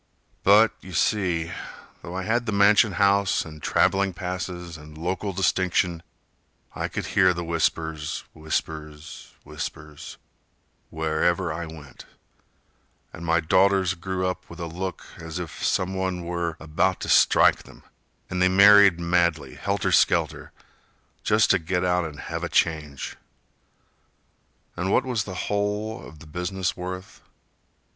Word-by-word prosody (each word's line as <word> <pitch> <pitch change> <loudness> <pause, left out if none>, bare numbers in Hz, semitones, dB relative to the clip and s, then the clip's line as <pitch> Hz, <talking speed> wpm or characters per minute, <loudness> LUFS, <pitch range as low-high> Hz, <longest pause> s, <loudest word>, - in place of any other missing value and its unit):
But, 105 +3 +5
you 95 - -11
see, 85 -3 0 0.5
though 85 - -8
I 95 - -3
had 120 +4 0
the - - 0
mansion 100 +1 +4
house 100 +1 +2
And 80 -2 -11
traveling 95 +4 +2
passes 90 -1 -5
and 75 0 -12
local 95 +5 -2
distinction, 90 -2 0 0.7
I - - -3
could - - -4
hear 95 -2 +4
the 85 - -3
whispers, 80 -2 -2
whispers, 80 0 -5
whispers, 75 -1 -8 0.7
Wherever 80 +2 0
I 80 +1 -5
went, 75 -3 -12 1.1
and 85 - -9
my 85 0 +2
daughters 95 +2 +3
grew 95 +1 -3
up 90 0 -4
With - - -11
a 85 - -3
look 90 +3 -5
as 80 +1 -6
if 85 -4 -6
some 95 +1 0
one 95 -2 -2
were 85 -1 -3
about 80 +4 0
to - - -4
strike - - +5
them; - - -17 0.4
And 90 0 -3
they 90 - +5
married 100 -1 +7
madly, 85 -5 +1
helter - - -1
skelter, - - +2 0.7
Just 105 +1 +3
to 95 - +3
get 90 +2 -1
out 90 -1 +1
and 75 -3 -8
have - - -5
a - - -2
change. 75 -4 -1 1.6
And 95 +2 -2
what - - +3
was 120 -5 -1
the 95 - -7
whole 105 +2 -2
of 80 - -12
the 75 - -14
business 90 +4 -3
worth? 95 +3 -7
90 Hz, 140 wpm, -25 LUFS, 80-95 Hz, 1.6 s, married